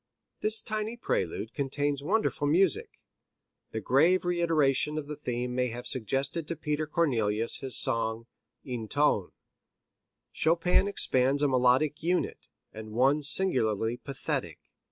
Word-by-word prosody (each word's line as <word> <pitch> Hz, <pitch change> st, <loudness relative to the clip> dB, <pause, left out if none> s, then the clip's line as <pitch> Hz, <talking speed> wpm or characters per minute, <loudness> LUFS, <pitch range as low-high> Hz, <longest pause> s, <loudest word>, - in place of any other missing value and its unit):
This 215 Hz, 0 st, +2 dB
tiny 215 Hz, +2 st, -3 dB
prelude 105 Hz, -, -2 dB
contains 140 Hz, 0 st, -2 dB
wonderful 175 Hz, -3 st, 0 dB
music. 170 Hz, +2 st, +1 dB, 0.7 s
The 110 Hz, -, -4 dB
grave 160 Hz, -, +3 dB
reiteration 155 Hz, -4 st, +1 dB
of 155 Hz, -, -3 dB
the 150 Hz, +1 st, -6 dB
theme 125 Hz, -3 st, -4 dB
may 125 Hz, 0 st, 0 dB
have 120 Hz, +1 st, -7 dB
suggested 135 Hz, +6 st, -3 dB
to 170 Hz, -, -3 dB
Peter 150 Hz, 0 st, -2 dB
Cornelius 115 Hz, -9 st, +1 dB
his 135 Hz, -2 st, +1 dB
song 115 Hz, -2 st, +2 dB, 0.4 s
"Ein 120 Hz, -4 st, -4 dB
Ton." 125 Hz, -9 st, +1 dB, 1.0 s
Chopin 170 Hz, +4 st, +2 dB
expands 140 Hz, -7 st, +1 dB
a -, -, +4 dB
melodic 130 Hz, +3 st, +2 dB
unit, 175 Hz, +2 st, -1 dB, 0.3 s
and 110 Hz, 0 st, -9 dB
one 135 Hz, +6 st, +3 dB
singularly 120 Hz, -, +1 dB
pathetic. 135 Hz, +2 st, -4 dB
140 Hz, 125 wpm, -28 LUFS, 125-165 Hz, 1.0 s, a